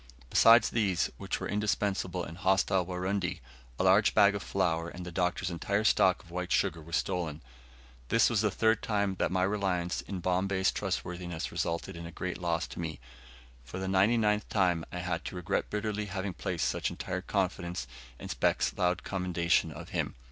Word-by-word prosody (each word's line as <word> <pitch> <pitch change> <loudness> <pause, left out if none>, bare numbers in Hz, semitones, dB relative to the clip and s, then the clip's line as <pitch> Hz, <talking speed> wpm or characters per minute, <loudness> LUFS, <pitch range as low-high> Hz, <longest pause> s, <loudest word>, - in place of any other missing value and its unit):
Besides 115 +1 +7
these, 100 -6 +1
which - - -3
were - - -3
indispensable 100 -3 -1
in 85 - -7
hostile 95 +1 +2
Warundi, 95 +1 -2 0.4
a - - 0
large 95 +3 +5
bag 100 0 +6
of 100 - -3
flour 85 -4 0
and 90 +1 -8
the 90 - -6
Doctor's 90 +1 -1
entire 100 +5 -1
stock 95 -4 +4
of 85 - -17
white 90 +1 -4
sugar 80 -5 +1
were 80 +2 -13
stolen. 85 -3 -1 0.7
This 115 - +5
was 115 -4 +2
the 105 - +2
third 110 +2 +2
time 100 -3 0
that - - +1
my 90 0 +1
reliance 95 -3 0
in 95 -2 -6
Bombay's 95 +2 +1
trustworthiness 90 -2 -3
resulted 85 +3 -2
in 85 0 -7
a - - -8
great 90 0 -4
loss 85 -1 0
to - - -8
me, 80 -2 -3
and - - -27 0.6
for 65 +9 -8
the 95 0 -3
ninety 95 +5 +3
ninth 105 -1 +1
time 90 -5 +2
I - - -5
had 90 -1 -2
to - - -5
regret 90 -1 -1
bitterly 105 0 -2
having 95 0 -3
placed - - -2
such - - -1
entire 90 0 -4
confidence 90 -7 -2 0.3
in - - -8
Speke's - - +1
loud 90 0 +1
commendation 90 -3 +1
of - - -9
him. - - -2
90 Hz, 185 wpm, -30 LUFS, 90-100 Hz, 0.7 s, Besides